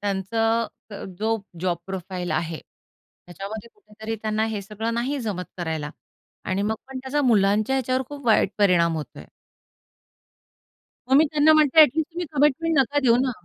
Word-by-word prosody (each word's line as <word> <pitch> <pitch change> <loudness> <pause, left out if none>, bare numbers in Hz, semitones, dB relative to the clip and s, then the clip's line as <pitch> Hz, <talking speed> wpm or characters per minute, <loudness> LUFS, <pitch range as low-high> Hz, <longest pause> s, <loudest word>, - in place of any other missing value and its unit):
त्यांचं 225 +3 0 0.2
अ, 200 - -7
जो 225 +1 +1 0.2
job 180 -2 0
profile 185 -1 -5
आहे 160 0 -2
त्याच्यामध्ये 200 +6 -12
कुठेतरी 220 - -7
त्यांना 215 0 0
हे 205 - -4
सगळं 215 +3 -4
नाही 255 +5 -1
जमत 205 -6 -3
करायला 160 -3 -3 0.5
आणि 190 +1 -1
मग 220 +2 0
पण 265 - -6
त्याचा 265 +3 -1
मुलांच्या 215 0 +3
ह्याच्यावर 255 0 0
खूप 285 -3 -9
वाईट 215 -3 +4
परिणाम 175 -5 +3
होतोय. 155 - -7 1.8
मग 265 - +3
मी 310 - +6
त्यांना 305 +1 +5
म्हणते 310 0 +5
ॲट 305 - +9
लिस्ट 320 +2 0
तुम्ही 350 0 -3
कमिटमेंट 295 +2 +2
नका 275 +2 +2
देऊ 240 -4 +4
ना. - - 0
220 Hz, 155 wpm, -24 LUFS, 195-265 Hz, 1.8 s, ॲट